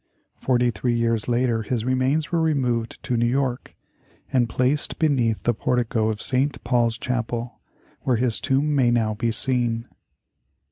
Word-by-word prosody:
Forty 125 Hz, -1 st, +2 dB
three 120 Hz, +3 st, -1 dB
years 115 Hz, -2 st, 0 dB
later 120 Hz, -1 st, +1 dB
his 115 Hz, +1 st, -2 dB
remains 130 Hz, +4 st, +1 dB
were 170 Hz, -1 st, +1 dB
removed 125 Hz, -7 st, 0 dB
to 125 Hz, -, -1 dB
New 120 Hz, 0 st, +2 dB
York, 130 Hz, 0 st, -1 dB, 0.6 s
and 120 Hz, -3 st, +2 dB
placed 130 Hz, +6 st, 0 dB
beneath 125 Hz, -8 st, +1 dB
the 120 Hz, -, +2 dB
portico 115 Hz, -1 st, 0 dB
of 105 Hz, -1 st, -3 dB
St. 135 Hz, +2 st, 0 dB
Paul's 120 Hz, -1 st, +1 dB
Chapel, 120 Hz, -1 st, -3 dB, 0.4 s
where 130 Hz, -, +1 dB
his 120 Hz, -1 st, +1 dB
tomb 140 Hz, +3 st, +1 dB
may 130 Hz, -4 st, +3 dB
now 115 Hz, -2 st, +1 dB
be 115 Hz, +2 st, -1 dB
seen. 120 Hz, -2 st, 0 dB
120 Hz, 150 wpm, -23 LUFS, 115-130 Hz, 0.6 s, may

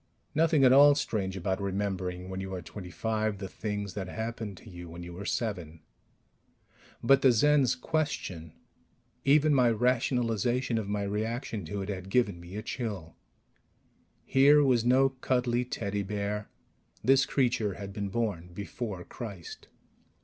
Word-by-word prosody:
Nothing 155 Hz, -2 st, +3 dB
at 130 Hz, -1 st, +7 dB
all 145 Hz, +1 st, +8 dB
strange 100 Hz, -9 st, -2 dB
about 95 Hz, +2 st, -2 dB
remembering, 95 Hz, -2 st, -2 dB
when 95 Hz, 0 st, -5 dB
you 95 Hz, 0 st, -5 dB
are 90 Hz, -, -5 dB
twenty 90 Hz, +1 st, -9 dB
five, 110 Hz, +2 st, -1 dB
the 95 Hz, 0 st, -5 dB
things 105 Hz, 0 st, -4 dB
that 95 Hz, -1 st, -4 dB
happened 110 Hz, -1 st, -5 dB
to -, -, -15 dB
you 90 Hz, -3 st, -9 dB
when 85 Hz, +1 st, -8 dB
you 85 Hz, 0 st, -8 dB
were 95 Hz, +3 st, -7 dB
seven... 90 Hz, -9 st, -3 dB, 1.2 s
But 135 Hz, +3 st, +5 dB
the 130 Hz, -, +6 dB
Zen's 140 Hz, +1 st, +4 dB
question, 125 Hz, -, -3 dB, 0.7 s
even 150 Hz, +2 st, +5 dB
my 125 Hz, -3 st, +5 dB
rationalization 120 Hz, 0 st, +1 dB
of 100 Hz, -2 st, -5 dB
my 105 Hz, 0 st, -1 dB
reaction 110 Hz, 0 st, -3 dB
to 100 Hz, +5 st, -4 dB
it, 95 Hz, -, -7 dB
had 95 Hz, -1 st, -5 dB
given 100 Hz, -6 st, +1 dB
me 85 Hz, +2 st, -10 dB
a 105 Hz, -, -4 dB
chill. 105 Hz, -10 st, -5 dB, 1.1 s
Here 145 Hz, +2 st, +6 dB
was 125 Hz, -4 st, +3 dB
no 130 Hz, +3 st, +4 dB
cuddly 125 Hz, -2 st, 0 dB
teddy 100 Hz, -4 st, -3 dB
bear. 105 Hz, +1 st, -3 dB, 0.5 s
This 135 Hz, +1 st, +4 dB
creature 120 Hz, -8 st, +1 dB
had 100 Hz, -1 st, -7 dB
been 100 Hz, -1 st, -3 dB
born 100 Hz, -6 st, -2 dB
before 100 Hz, -2 st, -5 dB
Christ! 100 Hz, -7 st, -9 dB
105 Hz, 150 wpm, -29 LUFS, 95-125 Hz, 1.2 s, all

